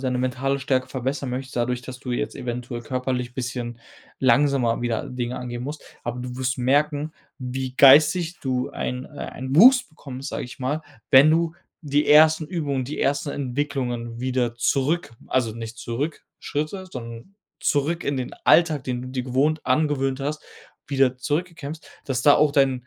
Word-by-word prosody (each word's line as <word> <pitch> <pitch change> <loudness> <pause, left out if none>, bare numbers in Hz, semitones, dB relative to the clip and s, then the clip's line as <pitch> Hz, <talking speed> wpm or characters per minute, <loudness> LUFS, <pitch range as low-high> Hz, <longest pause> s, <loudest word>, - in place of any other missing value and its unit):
deine 130 -1 -1
mentale 130 +2 -1
Stärke 130 -1 0
verbessern 135 +1 -3
möchtest 130 +1 -5
dadurch, 120 +1 -1
dass 125 0 -8
du 125 -1 -5
jetzt 145 - -2
eventuell 120 0 -5
körperlich 125 0 -3
bisschen 120 -2 -4 0.4
langsamer 135 -3 +3
wieder 120 -2 -2
Dinge 125 0 -3
angehen 120 -1 -5
musst, 150 +2 -6 0.2
aber 120 +1 -3
du 125 0 -6
wirst 130 0 -1
merken, 145 +4 +1 0.3
wie 130 0 -4
geistig 155 +5 +6
du 130 -2 -1
einen 125 +1 -4
äh, - - -15 0.2
einen 130 +2 -4
Wuchs 255 +6 +7
bekommst, 135 -3 -8
sage - - -4
ich 125 +3 -11
mal, 145 +5 -1 0.3
wenn 135 +4 +8
du 165 0 +1 0.3
die 145 0 +1
1. 155 +1 +6
Übungen, 145 -7 -2
die 145 - -5
ersten 145 +1 0
Entwicklungen 125 -4 -3
wieder 125 -2 0
zurück 140 +7 0 0.2
also, 125 -3 +1
nicht 115 0 -7
zurück 140 +7 -4
Schritte, 155 +6 -4
sondern 115 +4 -9 0.2
zurück 155 +4 0
in 140 - -1
den 130 -1 -4
Alltag, 155 -5 +4
den 125 -1 -3
du 125 - -7
dir 130 -1 -3
gewohnt 140 +5 0
angewöhnt 135 -1 +1
hast, 150 +2 -3 0.4
wieder 135 -2 +2
zurückkämpfst, 155 +2 -4 0.2
dass 130 -2 -2
da 145 - +7
auch 150 -1 +3
dein 135 -3 +2
130 Hz, 165 wpm, -24 LUFS, 125-150 Hz, 0.4 s, wenn